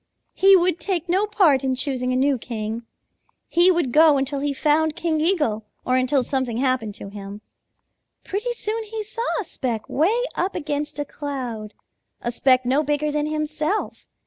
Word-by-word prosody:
He 390 0 +6
would 355 -2 +2
take 350 0 -2
no 380 +4 +1
part 340 -11 +3
in 260 -1 0
choosing 255 -1 -1
a - - 0
new 270 0 +2
king. 220 -1 -4 0.7
He 345 +2 +5
would 340 -8 +1
go 305 +1 +6
until 275 +1 -1
he 285 +1 -1
found 300 +2 +1
King 315 -2 -1
Eagle 300 - +1 0.2
or 255 - +2
until 255 +1 +2
something 255 -3 -1
happened 250 -5 0
to 200 - -8
him. 200 0 -9 0.8
Pretty 425 +5 -3
soon 450 -1 -3
he 435 0 -5
saw 435 +3 -6 0.2
a - - -2
speck 245 - -4
way 415 - +1
up 375 +2 -2
against 295 -2 -3
a 290 - -2
cloud, 250 -8 -6 0.4
a 240 - -3
speck 255 +1 +3
no 265 +4 +2
bigger 295 0 0
than 300 0 -1
himself. 305 +5 -2
290 Hz, 175 wpm, -23 LUFS, 255-345 Hz, 0.8 s, He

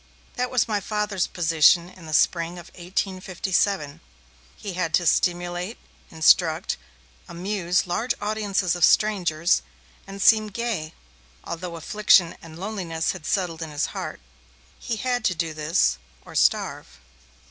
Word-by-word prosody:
That 250 -1 -2
was 250 -3 +1
my 210 -2 0
Father's 210 -2 -1
position 170 0 +4
in 180 -3 -14
the 155 - -6
spring 170 +2 +2
of 175 0 -11
1857; 185 -2 -2 0.6
he 200 -3 -6
had 175 -3 0
to 175 - +1
stimulate, 175 +4 0 0.3
instruct, 160 +1 +3 0.5
amuse 180 0 -1
large 225 +7 -1
audiences 205 -4 0
of 175 - -2
strangers, 175 -6 +3 0.5
and 195 0 -8
seem 215 +2 +5
gay, 210 -7 -4 0.5
although 170 0 -6
affliction 185 +1 +3
and 160 -1 -12
loneliness 180 -5 -2
had 155 - -8
settled 175 -4 -1
in 160 - -4
his 145 -1 -1
heart. - - -5 0.6
He 235 - -3
had 245 +1 -1
to 185 - +2
do 165 -1 -2
this, 155 - +1 0.3
or - - -12
starve. - - 0
180 Hz, 135 wpm, -24 LUFS, 165-205 Hz, 0.6 s, seem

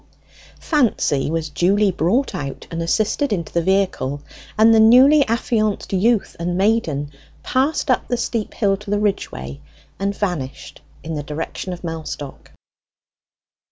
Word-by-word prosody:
Fancy 225 - +1
was 160 -1 -2
duly 195 +5 +2
brought 185 - 0
out 140 -2 -5
and 165 0 -3
assisted 215 - 0
into 170 -6 -3
the 170 - +2
vehicle, 170 -7 0 0.3
and 220 +1 +6
the 225 - +5
newly 260 +7 +7
affianced 220 -3 -1
youth 215 +3 +1
and 175 +1 -2
maiden 175 -9 0 0.3
passed 270 +2 0
up 255 - 0
the 245 - -1
steep 230 -2 -3
hill 200 -3 +2
to 205 0 -11
the 205 - +1
Ridgeway, 70 - -3 0.4
and 200 +1 -2
vanished 170 -10 -4 0.2
in 165 - -5
the 150 - -3
direction 150 +5 -5
of 180 0 -7
Mellstock. 160 -4 -7
195 Hz, 140 wpm, -20 LUFS, 160-225 Hz, 0.4 s, newly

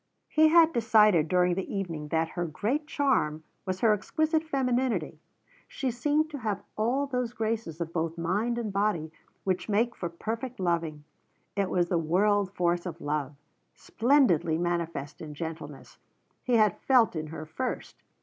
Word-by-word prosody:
He 315 0 +5
had 330 0 +6
decided 215 -8 +4
during 180 +1 +3
the 190 +1 -4
evening 170 -7 -4
that 160 +1 0
her 175 0 -3
great 245 - -2
charm 255 - +1 0.2
was 185 0 -2
her 225 -2 +5
exquisite 315 - 0
femininity; 250 - -1 0.5
she 265 -3 -2
seemed 295 +6 +1
to 285 - -5
have 210 -4 -3
all 245 +6 +1
those 250 -3 -2
graces 220 -8 -3
of 170 -1 -4
both 165 0 -2
mind 205 +8 0
and 220 -4 -3
body 195 -6 0 0.3
which 185 +2 -1
make 230 +3 +1
for 175 - -4
perfect 225 +8 -5
loving. 165 -4 -1 0.5
It 200 -2 0
was 175 -1 +1
the 175 - +2
world 195 +4 +2
force 175 0 0
of 170 -1 -6
love, 145 -2 -2 0.4
splendidly 225 - +2
manifest 170 -4 -3
in 150 -2 -8
gentleness, 160 +1 -7 0.4
he 250 - +1
had 215 -4 +3
felt 250 -8 +4
in 155 -1 -3
her 155 0 -7
first. 250 +12 -5
195 Hz, 160 wpm, -28 LUFS, 165-240 Hz, 0.5 s, had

